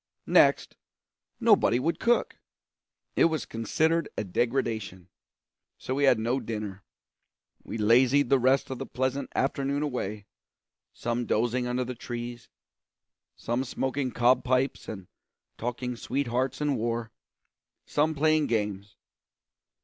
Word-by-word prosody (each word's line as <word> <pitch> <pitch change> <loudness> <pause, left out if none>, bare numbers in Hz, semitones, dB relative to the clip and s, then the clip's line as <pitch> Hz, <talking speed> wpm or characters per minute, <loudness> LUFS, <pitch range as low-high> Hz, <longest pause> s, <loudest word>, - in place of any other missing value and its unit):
Next, - - +3 0.6
nobody 120 - +4
would 165 +7 -1
cook; 240 +1 +1 0.8
it - - +5
was 160 -5 0
considered 160 +9 0
a - - 0
degradation; 110 -3 -2 0.7
so 130 - -4
we 140 +1 +2
had 130 -3 +5
no 120 +4 0
dinner. 105 -5 -5 0.8
We - - -6
lazied 125 +6 +4
the 135 -1 +4
rest 130 +2 +2
of 130 - -5
the - - -5
pleasant 130 +2 -2
afternoon 140 +1 0
away, 110 -7 -3 0.7
some 120 0 -3
dozing 120 +2 +1
under 125 +1 0
the 125 +1 -5
trees, 120 0 -7 0.9
some 120 +3 -2
smoking 130 +1 -2
cob 125 +1 +3
pipes 130 +1 0
and 95 -4 -7 0.5
talking 125 +1 -4
sweethearts 130 +2 -2
and 145 -2 +1
war, 115 0 -2 0.7
some 155 +2 +1
playing 155 +1 +3
games. 105 -2 -2
125 Hz, 120 wpm, -28 LUFS, 115-135 Hz, 0.9 s, it